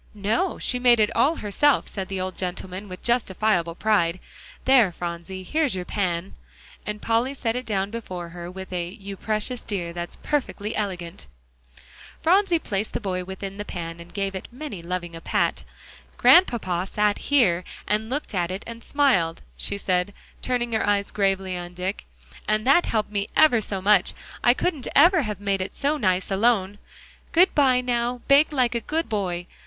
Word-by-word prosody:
"No; 215 - 0
she 250 - -1
made 245 -2 +5
it 210 - +2
all 275 +8 +3
herself," 270 +5 +2
said 190 -2 -4
the 195 -1 -4
old 185 0 -3
gentleman, 185 +2 -5
with 185 0 -9
justifiable 210 -7 +1
pride. 185 -4 +1 0.5
"There, 255 -8 +5
Phronsie, 175 +2 -6
here's 300 - 0
your 180 -1 -4
pan," 180 -2 -2 0.5
as 210 - -1
Polly 235 +4 +1
set 230 -3 -1
it 250 -1 -4
down 200 -2 -1
before 185 -7 -6
her 175 0 -8
with 190 0 -8
a 175 -1 -1
"You 195 +1 -8
precious 215 +4 -2
dear, 175 -5 -4
that's 175 0 -5
perfectly 230 -7 -2
elegant!" 185 -4 -4 1.0
Phronsie 365 +1 +4
placed 210 -8 -3
the - - -1
boy 185 -4 -3
within 190 +1 -7
the 205 - -4
pan, 170 -4 -6
and 170 +1 -12
gave 195 -1 -2
it 190 - -6
many 255 - -7
a 170 - -13
loving 180 -1 -3
pat. - - 0 0.5
"Grandpapa 195 - +4
sat 210 +1 +1
here, 220 -12 +4 0.2
and 215 +1 0
looked 280 -2 -3
at 175 -3 0
it, 190 +2 -5
and 230 0 -9
smiled," 220 - +1
she 200 - -2
said, 185 0 -1 0.3
turning 240 -2 -1
her 220 - +1
eyes 200 -1 +1
gravely 195 -2 0
on 175 0 -7
Dick, 185 +3 -4 0.4
"and 215 0 +1
that 280 +7 +5
helped 215 -2 -1 0.2
ever 275 -8 +5
so 195 -2 -3
much. 200 -2 +4 0.3
I 240 +1 +5
couldn't 305 -6 -2
ever 340 +4 +6
have 210 -6 -4
made 200 -1 0
it 185 - -5
so 290 +2 0
nice 185 -6 0
alone. 205 -1 +2 0.5
Good 360 +3 +5
by; 260 -4 +4
now 245 0 -1
bake 280 +3 +5
like 255 -4 +2
a 235 - 0
good 320 +7 -2
boy. 180 -5 -2
205 Hz, 175 wpm, -24 LUFS, 185-245 Hz, 1.0 s, ever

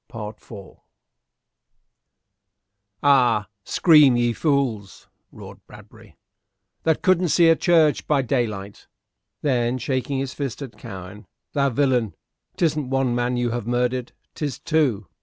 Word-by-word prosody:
CHAPTER 110 0 -9
IV 100 -2 -13 2.3
"Ay, 125 -6 +4 0.2
scream, 150 - +5
ye 120 -1 +1
fools," 125 - -2 0.2
roared - - -12
Bradbury, - - -16 0.6
"that 160 -1 0
couldn't 185 -1 +3
see 165 +3 +4
a 165 - +6
church 160 -4 +2
by 140 -3 +2
daylight." 110 -6 -3 0.6
Then, 125 -3 0
shaking 130 +2 -2
his 135 -1 -3
fist 140 -1 -5
at 130 -4 -10
Cowen, 100 -2 -10 0.3
"Thou 140 -2 +2
villain! 125 -4 0 0.4
'Tisn't 155 -5 0
one 135 -2 0
man 120 +1 -1
you 120 -1 -1
have 120 -2 -4
murdered, 125 +1 -1 0.2
'tis 145 -5 -4
two. 145 -11 0
130 Hz, 120 wpm, -22 LUFS, 115-145 Hz, 2.3 s, a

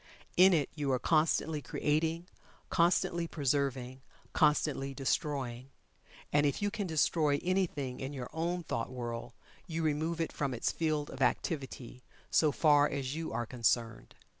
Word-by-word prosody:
In 185 +2 +7
it 155 -6 +2
you 145 -3 -1
are 130 - +3
constantly 155 +1 +1
creating 160 +4 -1 0.5
constantly 170 -1 +2
preserving 135 -4 -1 0.3
constantly 140 -2 +2
destroying. 135 -2 -2 0.6
And 145 0 +4
if 140 - -1
you 205 0 0
can 200 -2 -3
destroy 155 -2 +2
anything 170 -9 -1
in 135 +1 -4
your 130 -4 -5
own 170 +2 -1
thought 115 -6 -3
world 120 -1 -5 0.3
you 165 -1 -2
remove 160 +2 0
it 165 - -1
from 140 -3 -2
its 115 - 0
field 155 -3 -1
of 135 - -8
activity, 130 -2 -2 0.3
so 155 -2 +4
far 145 -1 +4
as 135 -2 -3
you 160 +1 -4
are 120 - -2
concerned. 115 -1 -1
145 Hz, 145 wpm, -32 LUFS, 130-160 Hz, 0.6 s, In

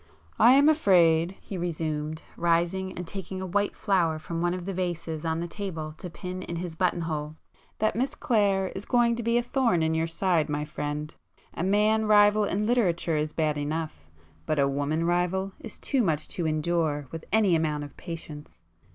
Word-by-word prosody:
"I 235 +3 +8
am 280 +2 +6
afraid—" 180 - +4
he 190 - -7
resumed, 155 -2 -3
rising 175 +3 +1
and 180 - -6
taking 190 +1 -6
a 190 - -4
white 205 +3 0
flower 175 -6 +1
from 165 +1 -5
one 175 +1 +1
of 180 -1 -6
the 195 - -3
vases 170 -3 -3
on 160 0 0
the 170 - -3
table 165 -5 -5
to 180 - -6
pin 180 +2 -6
in 170 - -5
his 170 0 -4
button 175 0 +1
hole—"that 155 +6 -4
Miss 255 +4 -1
Clare 200 -5 +1
is 190 +3 -7
going 240 -1 +3
to - - -2
be 235 +1 +1
a 240 - +1
thorn 235 -9 +1
in 160 0 +1
your 160 0 0
side, 165 -2 +1
my 150 0 -1
friend! 150 +1 -4 0.4
A - - -5
man 210 +3 +2
rival 210 0 +5
in 205 +1 -1
literature 180 -8 +1
is 150 0 -1
bad 155 -2 0
enough,—but 145 - -5
a 140 -1 +3
woman 145 +4 -1
rival 180 +3 0
is 225 - -9
too 270 -3 0
much 155 -8 0
to 170 -3 -2
endure 155 -1 0
with 165 -1 -6
any 210 -4 +4
amount 155 -2 0
of 145 - -10
patience! 160 -4 -8
170 Hz, 185 wpm, -27 LUFS, 155-195 Hz, 0.4 s, I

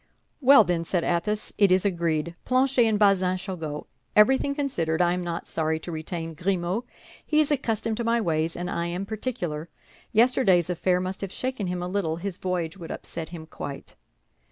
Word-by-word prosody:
"Well, 275 -2 +8
then," 175 -3 0
said 170 0 0
Athos, 210 +5 -1
"it 200 -3 +5
is 185 +2 +3
agreed. 170 -3 0
Planchet 255 -1 +3
and 215 -1 +2
Bazin 190 -3 +3
shall 190 0 -5
go. 150 -3 -5 0.3
Everything 265 +6 +4
considered, 170 - -1
I 175 0 +3
am 180 0 -2
not 170 -1 -4
sorry 160 0 0
to 175 - -7
retain 165 +1 -4
Grimaud; 180 +6 -1 0.4
he 305 - +3
is 305 -1 +3
accustomed 225 -5 0
to 235 - -1
my 230 +1 +2
ways, 165 -5 0
and 175 +1 -4
I 170 -1 -2
am 180 +3 -3
particular. 190 -8 -4 0.4
Yesterday's 215 -7 +4
affair 180 +1 +1
must 185 +1 -4
have 195 -2 -4
shaken 255 -5 -3
him 180 0 -2
a - - -3
little; 180 -4 -1
his 185 +1 -4
voyage 180 -2 -2
would 165 - -8
upset 165 -2 -6
him 165 -2 -8
quite." 145 -3 -8
180 Hz, 185 wpm, -26 LUFS, 170-215 Hz, 0.4 s, Well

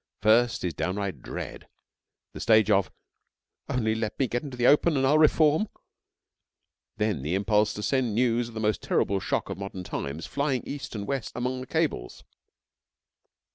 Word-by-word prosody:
First 115 +2 +4
is 90 -2 -1
downright 95 -3 -3
dread; - - -7 0.7
the - - -8
stage 110 -1 +4
of 100 -2 +3 0.8
'only 110 -3 +1
let 110 -1 -3
me 135 - +1
get 120 +1 -2
into 135 -4 -8
the 120 - +1
open 150 +3 +5
and 135 - +2
I'll 150 +3 +4
reform,' 155 +5 +4 1.3
then 105 -8 0
the 75 +7 -1
impulse 105 +2 +2
to 105 - -5
send 125 -5 0
news 120 0 +2
of 115 - -12
the - - -3
most 105 -1 0
terrible 100 0 +1
shock - - -2
of - - -6
modern 95 -2 -6
times 75 -1 -5
flying 140 -3 -1
east 140 -4 -6
and 100 -1 -4
west 135 0 -3
among 125 +1 -2
the 130 - -8
cables. 160 - -2
115 Hz, 170 wpm, -27 LUFS, 100-130 Hz, 1.3 s, open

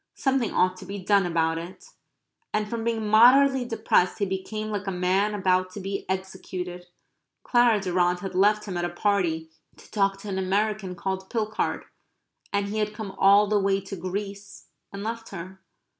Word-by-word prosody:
Something 270 -4 0
ought 185 0 +2
to 190 - -10
be 200 +1 -5
done 200 -1 +2
about 165 -1 +1
it. 185 - -11 0.6
And 210 0 0
from 230 +1 -4
being 225 -1 -1
moderately 255 +4 +6
depressed 220 -6 +1
he 205 - 0
became 205 +3 -4
like 205 -1 -4
a - - 0
man 190 +3 +1
about 185 -2 +1
to 205 - -6
be 195 0 -5
executed. 185 -1 -5 0.6
Clara 240 -3 +4
Durrant 180 -2 +1
had 195 0 -5
left 210 +3 +3
him 185 -4 -4
at 175 - -1
a 175 - 0
party 175 -4 0 0.3
to - - -17
talk 195 -2 +1
to 210 - -7
an 190 -1 -2
American 195 0 -1
called 190 +1 -4
Pilchard. 215 -2 -2 0.7
And 200 0 0
he 215 +1 -2
had 210 0 -1
come 210 -2 -5
all 200 +2 +6
the 210 0 +2
way 195 0 +2
to 195 +1 -7
Greece 200 +3 -6 0.2
and 200 0 -6
left 225 +1 -5
her. 190 +1 -8
195 Hz, 180 wpm, -26 LUFS, 185-215 Hz, 0.7 s, moderately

